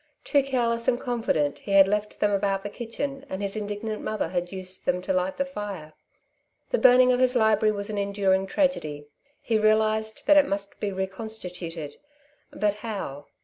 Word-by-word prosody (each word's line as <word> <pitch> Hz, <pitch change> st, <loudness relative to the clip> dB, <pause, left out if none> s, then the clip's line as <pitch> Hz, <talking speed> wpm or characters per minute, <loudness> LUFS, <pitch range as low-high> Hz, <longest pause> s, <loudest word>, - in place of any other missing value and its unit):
Too 285 Hz, -, +3 dB
careless 235 Hz, -4 st, -1 dB
and 240 Hz, -, +2 dB
confident, 225 Hz, -, -1 dB
he 200 Hz, -, -4 dB
had 195 Hz, -1 st, +8 dB
left 210 Hz, +1 st, -2 dB
them 205 Hz, -, +3 dB
about 195 Hz, -1 st, 0 dB
the 205 Hz, -, -5 dB
kitchen, 270 Hz, +5 st, -5 dB
and 190 Hz, -, -4 dB
his 200 Hz, 0 st, -1 dB
indignant 210 Hz, +1 st, -4 dB
mother 215 Hz, -6 st, -2 dB
had 175 Hz, -1 st, -2 dB
used 185 Hz, -1 st, -6 dB
them 180 Hz, -, +2 dB
to 190 Hz, -, -1 dB
light 185 Hz, +1 st, -1 dB
the 275 Hz, -, 0 dB
fire. 205 Hz, -, -7 dB, 0.8 s
The -, -, +2 dB
burning 255 Hz, 0 st, +6 dB
of 250 Hz, -, +2 dB
his 255 Hz, 0 st, +3 dB
library 220 Hz, -2 st, +4 dB
was 200 Hz, +1 st, -4 dB
an 205 Hz, -, -2 dB
enduring 195 Hz, -1 st, +1 dB
tragedy. 155 Hz, -, -1 dB, 0.3 s
He 225 Hz, -2 st, +1 dB
realized 215 Hz, 0 st, +1 dB
that 300 Hz, +1 st, +6 dB
it 285 Hz, -1 st, +6 dB
must 200 Hz, 0 st, -4 dB
be 205 Hz, -, -2 dB
reconstituted; 185 Hz, -5 st, -5 dB, 0.5 s
but 210 Hz, -1 st, 0 dB
how? 195 Hz, -11 st, -6 dB
205 Hz, 180 wpm, -26 LUFS, 190-230 Hz, 0.8 s, had